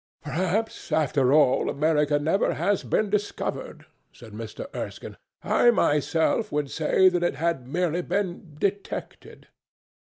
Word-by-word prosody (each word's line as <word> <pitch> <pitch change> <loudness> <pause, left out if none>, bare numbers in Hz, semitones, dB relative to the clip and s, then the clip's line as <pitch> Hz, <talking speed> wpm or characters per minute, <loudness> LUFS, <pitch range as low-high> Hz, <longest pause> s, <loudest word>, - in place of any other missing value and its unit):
"Perhaps, 185 +8 -2
after 140 -4 +2
all, 145 -3 +4
America 150 0 +2
never 160 +7 +1
has 205 -1 +1
been 210 -2 0
discovered," 210 0 -3 0.3
said - - -14
Mr. - - -7
Erskine; - - -6 0.3
"I 240 - +4
myself 165 - +1
would 145 -2 -2
say 160 +4 +3
that 180 -1 +2
it 175 - 0
had 160 -6 -1
merely 175 +3 0
been 180 -3 -3
detected." 200 +2 -4
165 Hz, 125 wpm, -25 LUFS, 150-195 Hz, 0.3 s, all